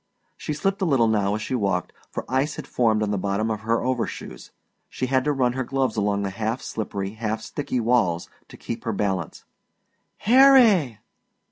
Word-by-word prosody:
She 150 - -4
slipped 195 +6 -1
a - - +2
little 135 -8 +3
now 105 -2 +1
as 110 - -4
she - - -4
walked, 100 -7 -1 0.2
for - - -5
ice 135 +4 0
had - - -7
formed 110 -3 +1
on 105 - -1
the 100 - -1
bottom 100 +3 -1
of 110 - -2
her 115 +1 0
overshoes; 125 -2 -4 0.4
she 130 - -3
had 130 0 +1
to 150 - +2
run 130 -3 +1
her 130 0 -2
gloves 130 -2 -1
along 100 -1 0
the 100 - -2
half 110 +4 -2
slippery, 100 -3 -4
half 110 0 -3
sticky 140 -3 -3
walls 110 -8 +1 0.2
to - - -13
keep 115 - -6
her 115 -2 -2
balance. 95 -5 -2 0.7
"Harry!" 230 - +5
115 Hz, 190 wpm, -24 LUFS, 105-130 Hz, 0.7 s, Harry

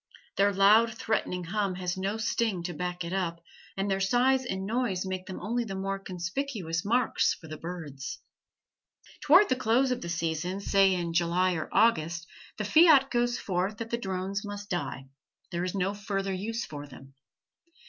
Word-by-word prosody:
Their 200 +1 +4
loud, 215 +4 +5
threatening 180 -5 -1
hum 195 +1 -1
has 180 -1 -2
no 195 +3 -2
sting 220 -4 0
to 175 0 -4
back 180 +2 -3
it 170 +2 -5
up, 170 -3 -1 0.4
and 195 +1 0
their 195 -1 0
size 250 +7 +3
and 190 -2 -3
noise 220 -4 -1
make 185 -1 -4
them 190 - -6
only 235 +6 -1
the 195 -4 -6
more 195 +1 -2
conspicuous 185 - -3
marks 240 +5 +2
for 160 - -14
the 155 - -6
birds. 160 -6 -6 1.1
Toward 350 +8 +7
the 255 - +2
close 255 +2 +2
of 250 - -1
the 170 - -5
season, 170 +2 -2
say 195 -1 +3
in 170 -2 -2
July 175 +2 +2
or 160 -2 -4
August, 170 -6 +2 0.3
the 210 - -2
fiat 300 - +6
goes 240 -1 +1
forth 190 +2 -2
that 230 -1 -6
the - - +2
drones 190 -1 -3
must 205 0 -7
die; 135 -6 -3 0.5
there 175 0 -2
is 185 +1 -3
no 195 +1 0
further 195 -1 -3
use 225 +5 -3
for 145 -1 -8
them. 135 0 -14
195 Hz, 180 wpm, -28 LUFS, 175-225 Hz, 1.1 s, Toward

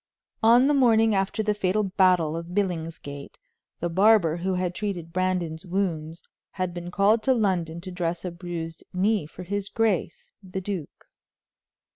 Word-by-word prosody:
On 235 +3 +6
the 295 - +3
morning 225 -5 +4
after 195 +3 0
the 210 0 +1
fatal 205 +1 0
battle 185 -5 +3
of 170 +2 -6
Billingsgate, 165 -7 -3 0.4
the 175 - 0
barber 190 -2 +4
who 185 +2 -1
had 180 -1 -1
treated 175 -5 -4
Brandon's 180 -3 -1
wounds 170 -4 -3 0.3
had 185 -2 -2
been 175 0 -6
called 205 +4 +3
to 260 +2 +3
London 175 -7 0
to 185 +1 -7
dress 175 0 -3
a 180 - -3
bruised 170 -2 -6
knee 195 -2 +1
for 180 - -10
his 200 +2 -3
grace, 215 -7 -1
the 190 -1 -5
duke. 190 -5 -6
185 Hz, 155 wpm, -25 LUFS, 170-205 Hz, 0.4 s, On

